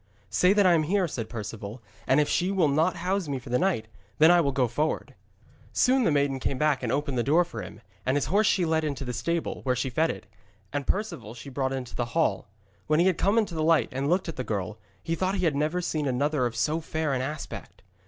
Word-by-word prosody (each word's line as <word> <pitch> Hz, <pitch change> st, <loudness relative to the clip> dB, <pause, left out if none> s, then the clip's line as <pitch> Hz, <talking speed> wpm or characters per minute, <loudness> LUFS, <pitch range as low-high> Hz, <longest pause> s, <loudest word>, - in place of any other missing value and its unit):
'Say 180 Hz, -, +4 dB
that 205 Hz, -1 st, +4 dB
I 180 Hz, -, +6 dB
am 165 Hz, -, +4 dB
here,' 185 Hz, +4 st, +1 dB
said 115 Hz, -8 st, -5 dB
Perceval. 110 Hz, 0 st, -6 dB, 0.3 s
'And 135 Hz, -, +4 dB
if 150 Hz, -, +3 dB
she 180 Hz, +2 st, +1 dB
will 185 Hz, -5 st, +3 dB
not 155 Hz, +6 st, +2 dB
house 190 Hz, -1 st, -1 dB
me 140 Hz, -2 st, -2 dB
for 120 Hz, -1 st, -9 dB
the 125 Hz, -, +2 dB
night, 175 Hz, -, 0 dB, 0.3 s
then 160 Hz, +2 st, +7 dB
will 170 Hz, -5 st, +4 dB
I -, -, -11 dB
go 125 Hz, -2 st, +3 dB
forward.' 150 Hz, +7 st, -2 dB, 0.6 s
Soon 260 Hz, -1 st, +3 dB
the -, -, +3 dB
maiden 140 Hz, -2 st, +1 dB
came 130 Hz, -, -2 dB
back 150 Hz, -1 st, +2 dB
and 120 Hz, -3 st, -2 dB
opened 140 Hz, -3 st, -1 dB
the -, -, +2 dB
door 160 Hz, +7 st, +3 dB
for 115 Hz, -9 st, -7 dB
him, 95 Hz, -, -10 dB, 0.2 s
and 130 Hz, +5 st, +1 dB
his 145 Hz, -, 0 dB
horse 205 Hz, +4 st, +2 dB
she 185 Hz, -5 st, +2 dB
led 160 Hz, -1 st, +1 dB
into 140 Hz, -3 st, -3 dB
the 125 Hz, -, -3 dB
stable, 170 Hz, +7 st, -2 dB
where 125 Hz, -1 st, 0 dB
she 130 Hz, +1 st, -2 dB
fed 160 Hz, +6 st, +2 dB
it; -, -, -5 dB, 0.5 s
and 145 Hz, -1 st, -3 dB
Perceval 125 Hz, -, -3 dB
she 130 Hz, +4 st, -9 dB
brought 130 Hz, 0 st, -1 dB
into 130 Hz, -2 st, -5 dB
the 120 Hz, -, -1 dB
hall. 145 Hz, -6 st, +1 dB, 0.4 s
When 155 Hz, +1 st, +3 dB
he 185 Hz, +2 st, +4 dB
came 200 Hz, +6 st, +1 dB
into 210 Hz, -6 st, +1 dB
the 160 Hz, -, -2 dB
light 160 Hz, 0 st, +3 dB
and 135 Hz, +2 st, -2 dB
looked 180 Hz, +2 st, +1 dB
at 165 Hz, -, -5 dB
the 130 Hz, -, -2 dB
girl, 105 Hz, -1 st, -3 dB, 0.2 s
he 165 Hz, -, -2 dB
thought 185 Hz, +3 st, 0 dB
he 185 Hz, -2 st, 0 dB
had 155 Hz, -4 st, +2 dB
never 155 Hz, +5 st, 0 dB
seen 155 Hz, -4 st, -1 dB
another 135 Hz, 0 st, +1 dB
of 115 Hz, -, -7 dB
so 155 Hz, +2 st, 0 dB
fair 155 Hz, -2 st, -2 dB
an 130 Hz, -, 0 dB
aspect. 150 Hz, +3 st, -6 dB
150 Hz, 250 wpm, -27 LUFS, 130-170 Hz, 0.6 s, then